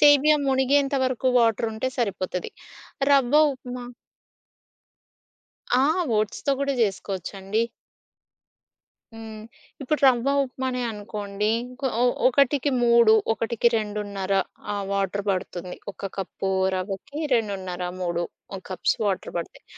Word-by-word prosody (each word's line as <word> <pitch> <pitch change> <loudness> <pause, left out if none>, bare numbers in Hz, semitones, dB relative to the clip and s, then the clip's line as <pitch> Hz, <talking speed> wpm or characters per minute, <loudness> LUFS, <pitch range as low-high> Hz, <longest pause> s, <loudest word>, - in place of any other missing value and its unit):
సేమియా 295 +1 +6
మునిగేంత 270 +1 +2
వరకు 255 0 0
వాటరుంటే 225 +1 +1
సరిపోతది. 185 -5 -2 0.6
రవ్వ 270 0 +3 0.2
ఉప్మా 250 -1 -8 2.0
ఆ! - - +4 0.4
ఓట్స్‌తో 215 +6 -1
గూడా 280 -1 0
జేసుకోవచ్చండి. 195 +1 -1 1.5
హ్మ్. 220 -1 -9 0.4
ఇప్పుడు 295 +3 0
రవ్వ 250 +1 +3 0.2
ఉప్మనే 255 -1 -3
అనుకోండి. 210 -1 -3 0.3
ఒక 265 +1 -2
ఒ - - +4 0.2
ఒకటికి 280 +2 +3
3, 235 -2 +6 0.2
ఒకటికి 230 +1 +1
రెండున్నర 205 -3 -3 0.4
ఆహ్ 200 -1 -2
వాటర్ 200 0 -1
పడుతుంది. 180 -1 -3 0.2
ఒక 195 0 -6
కప్పు 195 0 -3 0.3
రవ్వకి, 195 +9 -5 0.2
21/2 190 -5 -1 0.2
3 175 -1 -1 0.5
కప్స్ 185 -2 0
వాటర్ 195 -2 -1
పడతాయి. 170 - -7
220 Hz, 100 wpm, -25 LUFS, 195-255 Hz, 2.0 s, సేమియా